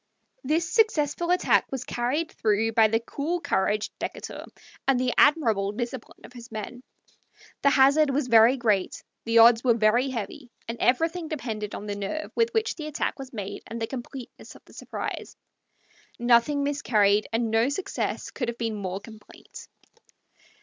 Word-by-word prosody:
This 320 +5 0
successful 340 - +1
attack 360 0 +2
was 265 -2 -3
carried 270 +7 -2
through 220 +1 0
by 225 0 +5
the 225 +1 +1
cool 295 +9 -3
courage 215 - 0
of - - -53
Decatur - - -6 0.4
and 270 -2 +3
the 255 -1 0
admirable 225 -10 +3
discipline 240 +2 -6
of - - -14
his 240 -1 -12
men. 220 +3 -7 0.8
The 280 - +5
hazard 280 +2 +4
was 275 -1 0
very 230 +2 +6
great, 210 -6 0 0.2
the 230 0 +2
odds 230 0 +7
were 240 -3 +4
very 230 +4 +2
heavy, 245 +2 -6 0.2
and 230 0 -5
everything 325 +6 +1
depended 225 -9 -5
on 205 - -7
the 205 - -3
nerve 205 +11 -4
with 460 0 +1
which 445 0 0
the 310 -2 -7
attack 300 - -3
was 270 -1 -8
made 200 -4 -6
and 230 +1 -6
the 225 - -1
completeness 250 +1 -9
of - - -17
the - - -19
surprise. - - -6 0.8
Nothing 240 +4 +3
miscarried, 215 -8 +2
and 225 0 0
no 225 +3 +3
success 385 +7 -3
could 245 - -4
have 235 0 -4
been 230 -2 -2
more 195 -2 -4
complete. 220 -1 -13
240 Hz, 165 wpm, -26 LUFS, 220-285 Hz, 0.8 s, odds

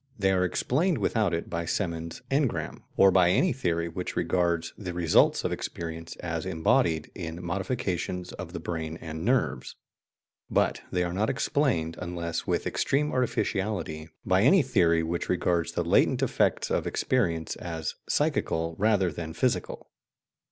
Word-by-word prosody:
They 95 -2 +2
are 90 -1 +2
explained 150 - +1
without 105 -2 +1
it 85 0 -2
by 85 0 -3
Semon's 85 -2 -3
"engram," 125 - 0 0.2
or 95 0 +7
by 90 -2 +5
any 170 - +3
theory 85 -9 -1
which 90 +2 -5
regards 85 -1 0
the 90 -4 -6
results 85 -2 +4
of - - -1
experience 80 -1 -5
as - - -4
embodied 80 -1 +1
in 85 -1 -6
modifications 90 -2 -2
of - - -7
the - - -5
brain 80 -1 -4
and 80 0 -6
nerves. 95 - 0 0.7
But - - +1
they 90 -1 +1
are 85 0 -2
not 105 +4 +1
explained, 120 - 0
unless 85 -1 -3
with - - 0
extreme 150 +2 +1
artificiality, 95 -10 -1 0.2
by 95 0 +3
any 170 - +6
theory 85 -10 +3
which 85 +1 -3
regards 85 -2 +1
the - - 0
latent - - +3
effects - - +1
of - - 0
experience 85 -11 0
as 80 -2 -4 0.2
psychical 80 0 0
rather 100 -4 +3
than 80 0 -6
physical. 125 +7 -1
90 Hz, 150 wpm, -27 LUFS, 85-105 Hz, 0.7 s, or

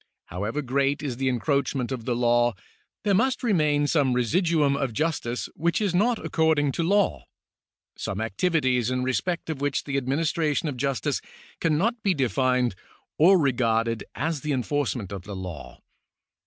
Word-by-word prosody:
However 105 - -3
great 140 +3 0
is 130 -5 -3
the 135 0 0
encroachment 135 0 0
of 120 -4 -4
the 120 - 0
law, 120 -1 +2 0.5
there 205 -2 +2
must 255 +6 +1
remain 150 -10 +2
some 145 -4 +2
residuum 150 - +2
of 135 -4 -2
justice 130 -4 -2
Avhich 170 +2 +1
is 205 -4 0
not 225 +6 +2
according 160 -3 +2
to 170 - -2
law 185 - +1 0.3
— - - -69 0.3
some 100 - -4
activities 125 - +1
in 130 0 -1
respect 170 +7 -1
of 145 -3 -6
which 145 -1 0
the 140 -1 -2
administration 150 +3 0
of 145 - -3
justice 130 -4 -1 0.4
cannot 190 +9 +1
be 195 -4 +1
defined 125 -3 +1 0.5
or 185 +5 +7
regarded 115 -6 +1
as 160 -1 -2
the 150 -1 -1
enforcement 125 -6 -2
of 100 -2 -5
the 100 +2 -8
law. 90 -4 -8
140 Hz, 155 wpm, -25 LUFS, 120-160 Hz, 0.5 s, or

